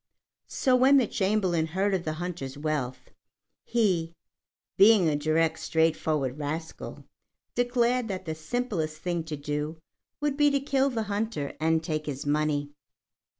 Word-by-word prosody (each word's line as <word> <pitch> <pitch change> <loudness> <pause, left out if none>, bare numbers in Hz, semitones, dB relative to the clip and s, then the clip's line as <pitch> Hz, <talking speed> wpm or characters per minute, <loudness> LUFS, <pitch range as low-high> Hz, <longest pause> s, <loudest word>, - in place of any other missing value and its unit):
So, 260 -1 +2
when 265 +3 +6
the 260 - +4
Chamberlain 190 -6 +1
heard 190 +5 0
of 185 -2 -1
the 155 - -1
hunter's 155 -5 -5
wealth, 145 -4 -3 0.5
he 180 -8 +1 0.6
being 200 -3 +6
a 150 - +2
direct, 155 +2 +1
straightforward 155 -4 0
rascal 160 +3 -5 0.5
declared 245 0 +1
that 190 -3 -4
the 160 - -2
simplest 160 -2 -3
thing 170 0 -2
to 155 -2 -5
do 150 +2 -3 0.4
would 290 -1 -1
be 295 -1 +5
to 280 -1 +1
kill 275 0 +1
the 230 -4 -2
hunter 205 -8 -2
and 160 0 +2
take 155 -1 -3
his 140 -1 -4
money. 145 -1 0
165 Hz, 145 wpm, -27 LUFS, 155-220 Hz, 0.6 s, when